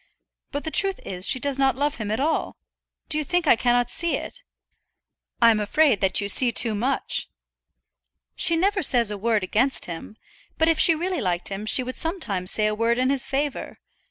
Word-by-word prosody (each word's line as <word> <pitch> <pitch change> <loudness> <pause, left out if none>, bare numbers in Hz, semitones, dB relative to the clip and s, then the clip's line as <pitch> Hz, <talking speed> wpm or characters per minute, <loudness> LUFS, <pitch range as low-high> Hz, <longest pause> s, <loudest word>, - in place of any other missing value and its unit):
But 285 0 -5
the 320 - -5
truth 390 0 +1
is 180 0 0
she 260 - +3
does 275 0 -1
not 270 -2 +1
love 285 +2 -2
him 215 -3 -6
at 220 - -3
all. 310 +3 -2 0.5
Do 310 - 0
you - - -2
think 355 +2 -1
I 290 - +4
cannot 245 +1 0
see 340 -1 0
it?" - - -10 1.0
"I'm 230 -2 +4
afraid 230 +1 +1
that 190 -1 0
you 200 - -3
see 240 +4 +5
too 230 -1 +2
much." 245 +7 -3 1.1
"She 335 - +3
never 390 +3 0
says 235 - +4
a - - -4
word 220 -1 -1
against 240 +8 0
him; 175 +5 -9 0.4
but 320 - +1
if 330 -1 +1
she 330 - +7
really 355 0 -4
liked 180 -3 -2
him 200 +2 -7
she 255 - +4
would 255 +1 -6
sometimes 210 - -2
say 215 - +2
a 215 - 0
word 230 +2 -1
in 255 +1 0
his 275 -2 +1
favour. 280 +1 -4
255 Hz, 200 wpm, -22 LUFS, 215-310 Hz, 1.1 s, she